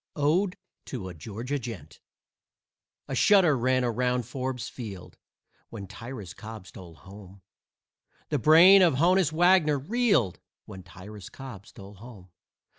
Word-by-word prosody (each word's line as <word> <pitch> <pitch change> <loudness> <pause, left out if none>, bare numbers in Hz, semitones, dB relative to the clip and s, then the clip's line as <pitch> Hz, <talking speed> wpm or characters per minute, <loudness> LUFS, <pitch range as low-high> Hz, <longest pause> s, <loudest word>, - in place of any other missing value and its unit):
ODE 170 +6 0 0.3
TO 100 -8 -6
A - - -8
GEORGIA 115 - -5
GENT 105 - -9 1.1
A - - -6
shudder 190 -8 +4
ran 130 +1 +1
around 125 +1 -1
Forbes 130 0 -5
Field 105 -7 -9 0.5
When 105 -4 -8
Tyrus 105 -1 -9
Cobb 110 -1 -10
stole 85 -4 -13
home. 95 +2 -15 0.9
The 150 - -1
brain 170 - +7
of 170 -7 +4
Honus 175 +2 +2
Wagner 165 -2 +3
reeled 200 - 0 0.3
When 95 - -10
Tyrus 95 +3 -12
Cobb 125 -8 -11
stole 100 +1 -13
home. 100 -3 -14
125 Hz, 125 wpm, -26 LUFS, 100-150 Hz, 1.1 s, brain